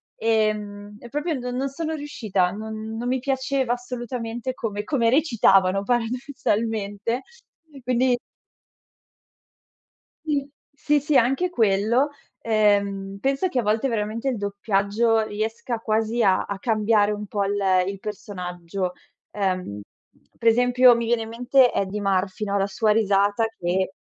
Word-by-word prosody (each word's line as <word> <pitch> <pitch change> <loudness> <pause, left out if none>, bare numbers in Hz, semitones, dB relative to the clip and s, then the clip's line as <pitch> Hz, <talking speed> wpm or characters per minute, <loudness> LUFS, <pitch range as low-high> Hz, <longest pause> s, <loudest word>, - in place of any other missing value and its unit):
ehm, 210 -2 -1
e 240 - -11
proprio 300 +5 -2
no 250 0 -4
non 265 +3 -2
sono 320 +3 -3
riuscita, 215 -11 -1
non 220 +2 -6
non 240 +2 -3
mi 255 +1 +1
piaceva 265 -1 0
assolutamente 245 0 -5
come 210 -4 -4
come 235 -1 +1
recitavano, 195 - +3
paradossalmente, 230 -2 -1 0.6
quindi 250 +1 +2 2.1
Sì. 285 -3 -1 0.2
Sì, 295 +1 +1
sì 290 0 +2
anche 270 +10 +2
quello. 225 - +2 0.3
Ehm, 200 -3 +1
penso 275 - +1
che 260 - 0
a - - +3
volte, 220 +5 +1
veramente, 225 +3 -2
il 250 - -2
doppiaggio 205 +2 +1
riesca 225 +3 -3
quasi 225 +1 0
a 190 -2 +3
a 200 - -4
cambiare 215 -1 +2
un 210 0 -4
po' 200 0 -1
l 200 +1 -1 0.3
il 195 0 -4
personaggio. 180 -3 -5 0.4
Ehm, 185 - -2 0.6
per 230 - -1
esempio, 245 +1 +6
mi 235 0 -1
viene 230 0 +1
in 220 - -8
mente 245 +2 +3
Eddie 200 +1 -2
Murphy, 195 +1 0
no, 200 0 0
la 195 0 +1
sua 215 +2 +1
risata, 205 0 +2
che 185 +2 -1
225 Hz, 135 wpm, -24 LUFS, 200-245 Hz, 2.1 s, esempio